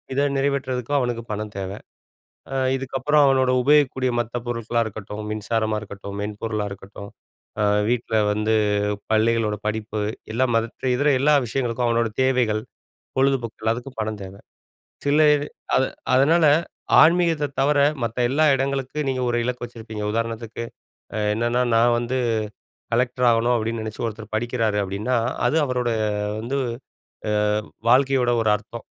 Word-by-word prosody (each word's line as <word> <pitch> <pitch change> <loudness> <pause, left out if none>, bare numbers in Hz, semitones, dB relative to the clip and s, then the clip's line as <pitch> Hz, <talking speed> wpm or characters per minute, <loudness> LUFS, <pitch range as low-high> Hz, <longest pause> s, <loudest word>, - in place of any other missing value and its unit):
இத 145 +1 +2
நிறைவேற்றதுக்கு 135 -1 -1
அவனுக்கு 120 -2 -2
பணம் 105 0 -5
தேவ. 95 - -4 0.8
ஆ - - -2 0.2
இதுக்கப்புறம் 135 +3 +2
அவனோட 130 -1 +3
உபயோகிக்கக்கூடிய 130 -2 +3
மத்த 120 +1 -5
பொருட்களா 115 0 -1
இருக்கட்டும், 105 0 -7
மின்சாரமா 110 0 -1
இருக்கட்டும், 100 -1 -8
மென்பொருளா 105 0 -3
இருக்கட்டும், 100 +1 -10 0.5
ஆ - - +3 0.3
வீட்ல 120 -2 -1 0.2
வந்து 105 +1 0 0.6
பள்ளிகளோட 110 -1 +2
படிப்பு 110 0 -3 0.3
எல்லாம் 125 +1 +1
மத்த 115 0 -2
இதர 145 +3 +1
எல்லா 150 +2 +4
விஷயங்களுக்கும், 120 0 -1
அவனோட 115 -1 +1
தேவைகள், 125 -5 +2 0.6
பொழுதுபோக்கு 130 -4 +1
எல்லாத்துக்கும் 120 +3 -2
பணம் 110 -1 -3
தேவ. 95 +1 -9 0.7
சில 150 +2 +4
இது 145 0 -3 0.3
அ - - +5 0.4
அதனால 155 +4 +4 0.6
ஆன்மீகத்த 165 -2 +3
தவர 145 +1 +3 0.3
மத்த 115 +2 -4
எல்லா 150 +4 +3
இடங்களுக்கு 135 +1 -2
நீங்க 130 -1 -1
ஒரு 120 - 0
இலக்கு 125 0 -3
வச்சிருப்பீங்க, 110 -3 -8
உதாரணத்துக்கு 115 0 -3 0.5
அ - - -1 0.2
என்னென்னா, 120 +2 0 0.2
நான் 120 +1 +4
வந்து 120 +2 -2 0.8
கலெக்டர் 125 +1 +1
ஆகணும் 115 +2 +2
அப்டின்னு 115 0 -2
நெனைச்சு 110 +2 -6
ஒருத்தர் 110 0 -8
படிக்கிறாரு 115 -2 0
அப்டின்னா, 100 +6 -1 0.3
அது 145 - 0
அவரோட 125 -2 -1 0.5
வந்து, 120 +5 -3 0.7
ஆ - - +1 0.6
வாழ்க்கையோட 130 -1 +4
ஒரு 110 - +2
அர்த்தம், 115 +2 -11
120 Hz, 135 wpm, -23 LUFS, 110-130 Hz, 0.8 s, அ